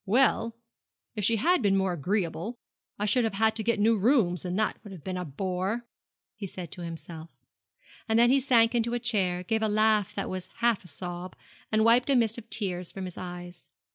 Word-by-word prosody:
'Well, 230 +1 +2 0.6
if 210 -3 -4
she 225 +4 +3
had 345 - +2
been 195 -3 +3
more 190 -1 +1
agreeable, 180 - -2 0.4
I 210 - -1
should 225 +4 +2
have 220 -3 -1
had 220 +1 +2
to 220 - -2
get 230 0 +1
new 225 +2 +4
rooms, 195 - +2
and 180 0 -3
that 215 - 0
would 205 - -10
have 180 -6 -10
been 185 - -4
a 180 - -3
bore,' 185 - -3 0.5
he 205 -2 -6
said 180 -3 -8
to 180 - -9
himself; 165 -1 -7 0.8
and 220 - +3
then 240 +1 +5
he 275 - +5
sank 235 -3 +4
into 235 0 0
a - - -1
chair, 190 -6 0
gave 220 +4 -1
a 220 - +2
laugh 215 -1 +2
that - - -2
was 185 0 -5
half 235 -4 +1
a - - -14
sob, 175 +2 -6 0.4
and 220 0 +3
wiped 240 +4 +4
a 275 - +4
mist 230 -1 +2
of 230 0 -15
tears 180 -4 +1
from 190 -1 -6
his 180 - -7
eyes. 175 -1 -9
205 Hz, 215 wpm, -28 LUFS, 180-230 Hz, 0.8 s, then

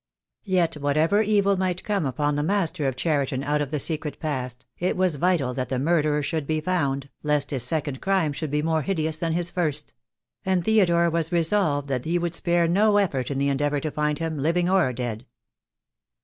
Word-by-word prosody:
Yet, 180 -5 +1
whatever 155 +8 +2
evil 200 -2 +2
might 185 -1 -1
come 200 -8 0
upon 145 +3 0
the 145 - 0
master 165 -4 0
of 130 - -1
Cheri 145 -1 0
ton 130 +1 -3
out 150 +1 0
of 145 - -2
the 150 0 -2
secret 150 -1 -1
past, 130 -5 -4
it 180 +1 0
was 185 -5 +1
vital 155 -6 +1
that 130 0 -3
the 130 - -1
murderer 150 0 +1
should 150 0 -2
be 155 0 0
found, 145 -5 -1
lest 150 -1 0
his 135 -3 -1
second 145 +1 -2
crime 190 -6 +1
should 155 +1 -4
be 150 +1 0
more 160 0 +1
hideous 160 -2 -1
than 165 -1 -1
his 175 +1 -1
first; 155 -5 -2 0.5
and 185 -2 0
Theodore 170 -6 +3
was 165 -1 -1
resolved 165 -4 +1
that 125 -2 -2
he 170 +2 +1
would 170 -1 -2
spare 170 0 +1
no 205 +4 +3
effort 140 -11 0
in 140 - -2
the 140 +1 +1
endeavour 145 +1 0
to 155 +2 -3
find 150 0 -1
him, 160 -2 -3
living 170 +5 +1
or 185 -8 +3
dead. 120 -2 -4
155 Hz, 205 wpm, -24 LUFS, 145-175 Hz, 0.5 s, Theodore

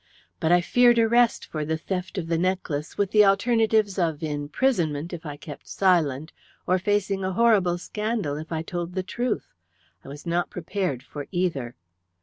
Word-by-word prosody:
But 160 - +1
I 175 0 +6
feared 240 +5 +4
arrest 235 +1 +3
for 155 -1 -4
the 160 +1 -1
theft 180 +4 -4
of 180 - -2
the 165 0 0
necklace, 175 -4 -2
with 200 -2 0
the 210 -1 +6
alternatives 215 0 +2
of 165 -3 0
imprisonment 155 - -1
if 170 -1 -7
I 145 -1 -6
kept 145 -1 -10
silent, 160 -6 +1 0.3
or 185 +1 +2
facing 195 0 0
a 185 0 -1
horrible 200 -5 +3
scandal 210 -4 -2
if 160 +2 -8
I 160 -1 -2
told 175 0 -4
the 185 - -1
truth. 240 +5 -3 0.5
I - - -14
was 145 +4 -9
not 170 +1 0
prepared 180 -7 -3
for 145 -2 -8
either. 165 -10 -2
180 Hz, 170 wpm, -25 LUFS, 155-205 Hz, 0.5 s, I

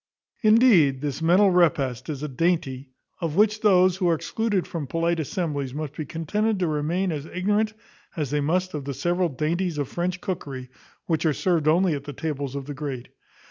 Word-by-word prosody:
Indeed, 215 - +5
this 145 +1 -3
mental 185 +4 +5
repast 155 -8 +1
is 145 -1 -4
a - - -1
dainty, 140 -3 -1 0.3
of 165 -3 -2
which 215 +2 +3
those 185 -3 +4
who 180 -3 +1
are 165 - +3
excluded 205 +3 -1
from 160 -5 -5
polite 165 +2 0
assemblies 145 -4 -3
must 150 -2 -4
be 155 - -5
contented 205 +8 -1
to 180 -2 0
remain 160 +5 0
as 150 -1 -4
ignorant 210 +5 0 0.4
as 145 -4 -2
they 150 0 +1
must 180 +5 0
of 145 -3 -4
the 140 -1 -4
several 175 +5 0
dainties 160 +4 -1
of 145 -2 -1
French 180 +1 -2
cookery, 135 -10 -5 0.3
which 160 -2 0
are 160 -3 +2
served 165 -1 0
only 170 +2 +4
at 140 -1 -5
the 145 - -6
tables 140 -2 -4
of 140 -1 -4
the 145 - -6
great. 135 -4 -5
160 Hz, 190 wpm, -25 LUFS, 145-185 Hz, 0.4 s, Indeed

